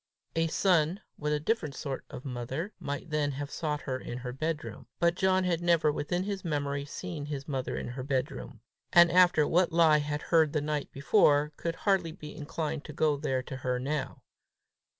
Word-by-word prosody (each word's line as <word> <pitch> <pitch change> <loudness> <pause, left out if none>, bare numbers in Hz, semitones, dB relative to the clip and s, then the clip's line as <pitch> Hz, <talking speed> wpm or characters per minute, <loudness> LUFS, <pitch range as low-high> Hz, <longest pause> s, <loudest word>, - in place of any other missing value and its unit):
A 165 0 +2
son 170 +1 +2 0.2
with 150 0 -1
a 150 - +1
different 155 - -1
sort 135 -1 -5
of 125 - -9
mother, 135 - -4
might 145 +2 -5
then 145 -2 +1
have 140 +1 -5
sought 150 -3 -2
her 130 -1 -3
in 120 - -6
her 125 0 -5
bedroom; 135 -7 -4
but 170 0 +4
John 190 +1 +2
had 175 -2 0
never 170 -3 +3
within 175 +5 -1
his 195 -1 -4
memory 145 -3 -1
seen 155 -1 -6
his 140 -2 -5
mother 135 -4 -2
in - - -4
her 125 +1 -5
bedroom, 130 -1 -3 0.3
and 175 0 +7
after 175 -4 +5
what 180 +1 +3
lie 160 -2 +5
had 150 0 -3
heard 160 -3 +3
the 155 - +2
night 150 -1 -2
before, 145 +1 +3
could 165 +1 -3
hardly 190 -4 +1
be 150 -4 -10
inclined 155 0 -3
to 150 - -8
go 150 0 +2
there 135 -3 -1
to 130 0 -6
her 130 -1 -1
now. 140 +1 -3
150 Hz, 190 wpm, -30 LUFS, 140-170 Hz, 0.3 s, and